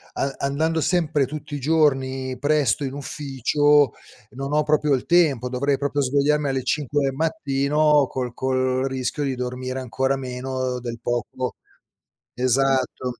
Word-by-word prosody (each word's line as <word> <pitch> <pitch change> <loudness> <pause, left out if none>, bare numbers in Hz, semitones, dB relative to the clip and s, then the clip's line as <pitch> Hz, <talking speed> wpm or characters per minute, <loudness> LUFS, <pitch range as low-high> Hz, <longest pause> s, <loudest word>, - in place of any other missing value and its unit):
a 135 0 -2
andando 160 +4 0
sempre 155 -4 +1
tutti 150 +1 -7
i - - -4
giorni 135 -3 +1
presto 145 -3 +1
in 135 0 -4
ufficio, 145 -1 +2 0.4
non 135 +2 -5
ho 150 +1 +3
proprio 150 -1 +2
il 130 - 0
tempo. 155 -8 +3
Dovrei 135 +2 0
proprio 145 +1 -1
svegliarmi 145 +2 +1
alle 135 -1 -1
5 145 0 0
del 135 - 0
mattino 150 -2 +2
col 125 -2 -4
col 130 0 0
rischio 130 +3 -2
di 135 -2 -1
dormire 125 +1 -4
ancora 135 +2 -1
meno 130 -1 -3
del 120 -1 -6
poco 120 +1 -3 0.8
esatto. 130 0 0
135 Hz, 140 wpm, -23 LUFS, 130-145 Hz, 0.8 s, ho